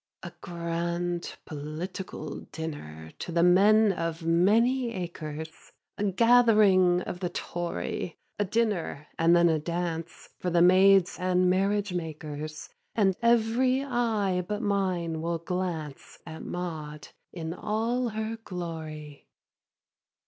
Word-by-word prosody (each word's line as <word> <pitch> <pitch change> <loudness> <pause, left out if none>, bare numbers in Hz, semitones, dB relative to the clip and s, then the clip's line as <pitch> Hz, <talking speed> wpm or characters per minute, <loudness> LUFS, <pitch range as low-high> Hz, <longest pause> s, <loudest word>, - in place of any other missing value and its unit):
3. - - -5
A - - -23
grand 170 0 -3
political 155 +2 -6
dinner 80 - -7
To - - -5
the 170 0 +2
men 205 +4 +6
of 165 -1 -4
many 230 +9 +3
acres, 160 -3 -5 0.5
A 205 - +1
gathering 205 -4 +5
of 180 - -6
the 180 -2 -2
Tory, 175 -1 -4 0.2
A - - +3
dinner 200 -8 -1
and 165 +1 +5
then 170 0 +5
a 160 -2 +2
dance 170 0 -4
For 180 - -1
the 170 0 +4
maids 185 0 +5
and 180 0 +2
marriage 200 +1 +1
makers, 155 -2 -5 0.3
And 195 -4 +3
every 235 +3 +3
eye 225 -8 0
but 210 +3 -3
mine 185 -5 0
will 170 +1 -1
glance 170 -4 -4
At 160 - -8
Maud 155 -4 -6 0.2
in 165 -2 -5
all 230 +6 -1
her 220 +1 -4
glory. 160 -5 -7
180 Hz, 120 wpm, -28 LUFS, 165-205 Hz, 0.5 s, men